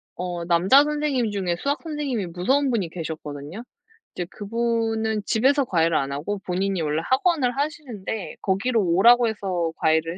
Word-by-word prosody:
어 175 Hz, -1 st, -4 dB
남자 180 Hz, +11 st, +5 dB
선생님 295 Hz, -6 st, -1 dB
중에 185 Hz, -4 st, -1 dB
수학 285 Hz, +1 st, -1 dB
선생님이 290 Hz, -, -3 dB
무서운 260 Hz, +12 st, +1 dB
분이 210 Hz, -9 st, -1 dB
계셨거든요. 160 Hz, +2 st, -7 dB, 0.5 s
이제 175 Hz, -, -4 dB
그분은 225 Hz, 0 st, -1 dB
집에서 270 Hz, +5 st, +3 dB
과외를 165 Hz, -6 st, +2 dB
안 135 Hz, 0 st, -1 dB
하고 160 Hz, +9 st, -3 dB
본인이 190 Hz, +1 st, -1 dB
원래 155 Hz, +1 st, -1 dB
학원을 265 Hz, -2 st, +2 dB
하시는데 240 Hz, -, -4 dB
거기로 210 Hz, +4 st, +1 dB
오라고 235 Hz, +8 st, +5 dB
해서 185 Hz, -6 st, -2 dB
과외를 160 Hz, +2 st, +1 dB
205 Hz, 360 characters per minute, -24 LUFS, 175-250 Hz, 0.5 s, 남자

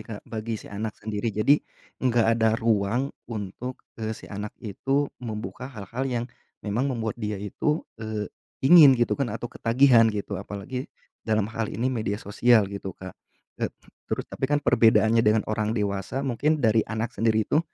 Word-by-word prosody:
Kak, 105 Hz, -2 st, -7 dB
bagi 110 Hz, 0 st, -4 dB
si -, -, -12 dB
anak 105 Hz, +1 st, -4 dB
sendiri. 105 Hz, +1 st, -3 dB
Jadi, 110 Hz, +8 st, +3 dB, 0.4 s
enggak 120 Hz, -3 st, +3 dB
ada 110 Hz, -1 st, +3 dB
ruang 115 Hz, +4 st, +1 dB, 0.2 s
untuk, 115 Hz, +3 st, -5 dB, 0.2 s
eee, 110 Hz, 0 st, -3 dB
si -, -, -12 dB
anak 105 Hz, +1 st, -6 dB
itu 135 Hz, +7 st, -1 dB, 0.2 s
membuka 120 Hz, +2 st, -6 dB
hal-hal 115 Hz, +1 st, -5 dB
yang, 120 Hz, -2 st, -1 dB, 0.4 s
memang 115 Hz, +6 st, 0 dB
membuat 115 Hz, -3 st, -3 dB
dia 105 Hz, -1 st, -2 dB
itu, 105 Hz, -, -1 dB, 0.2 s
eee, 110 Hz, -1 st, -3 dB, 0.4 s
ingin 145 Hz, -3 st, +9 dB
gitu 120 Hz, 0 st, +1 dB
kan 135 Hz, -, +1 dB
atau 115 Hz, +2 st, -5 dB
ketagihan 120 Hz, -1 st, +5 dB
gitu 100 Hz, -2 st, -3 dB
apalagi 105 Hz, +7 st, -6 dB, 0.3 s
dalam 110 Hz, -2 st, +1 dB
hal 115 Hz, -2 st, -2 dB
ini 125 Hz, +3 st, -1 dB
media 110 Hz, -4 st, -1 dB
sosial 110 Hz, +2 st, +3 dB
gitu 95 Hz, -2 st, -6 dB
Kak. 95 Hz, -1 st, -8 dB, 0.5 s
E -, -, +1 dB, 0.4 s
terus -, -, -2 dB
tapi 135 Hz, -, -3 dB
kan 145 Hz, -, +3 dB
perbedaannya 115 Hz, 0 st, +5 dB
dengan 110 Hz, 0 st, +3 dB
orang 110 Hz, +1 st, -1 dB
dewasa 100 Hz, +5 st, -2 dB
mungkin 140 Hz, +5 st, +1 dB
dari 110 Hz, 0 st, +5 dB
anak 110 Hz, +2 st, -2 dB
sendiri 110 Hz, 0 st, +2 dB
itu, 150 Hz, -, +2 dB
110 Hz, 165 wpm, -26 LUFS, 105-125 Hz, 0.5 s, ingin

